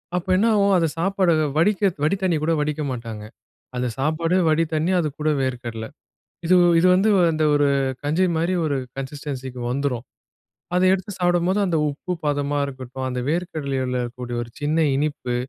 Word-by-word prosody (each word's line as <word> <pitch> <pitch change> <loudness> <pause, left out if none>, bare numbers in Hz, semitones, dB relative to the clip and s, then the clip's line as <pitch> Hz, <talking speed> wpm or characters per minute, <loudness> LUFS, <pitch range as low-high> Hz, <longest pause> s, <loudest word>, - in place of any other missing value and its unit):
அப்ப 180 - -2
என்ன 205 +5 +3
ஆவும் 200 -1 +3
அந்த 165 -2 +2
சாப்பாடு 190 +1 +1 0.3
வடிக்க, 195 +5 +2 0.2
வடி 155 +6 +2
தண்ணி 185 -3 +1
கூட 165 - +1
வடிக்க 150 +1 -1
மாட்டாங்க. 115 -4 -6 0.5
அத 125 0 -1
சாப்பாடே, 160 +5 +1
வடி 155 +1 +3
தண்ணி, 160 +3 +1
அதுக்கூட 155 -1 -1
வேர்க்கடலை. 120 -4 -4 0.6
இது, 185 - +5 0.2
இது 170 - +4
வந்து 195 +4 +3 0.2
அந்த 155 0 0
ஒரு 145 0 +3 0.4
கஞ்சி 155 +6 +1
மாரி 170 +3 0
ஒரு 145 -2 0 0.2
கன்சிஸ்டன்சிக்கு 135 -2 -6
வந்துரும். 130 -2 -2 0.7
அதை 180 +1 +3
எடுத்து 190 +2 -3
சாப்பிடும்போது, 175 +2 +2
அந்த 170 -4 0
உப்பு 150 +5 -5
பதமா 145 0 0
இருக்கட்டும், 130 -1 -7
அந்த 125 0 -3
வேர்க்கடலையில 140 -7 -2
இருக்கக்கூடிய 120 0 -5
ஒரு 120 - -13
சின்ன 155 +2 +2
இனிப்பு, 140 -4 -2
150 Hz, 155 wpm, -22 LUFS, 130-175 Hz, 0.7 s, இது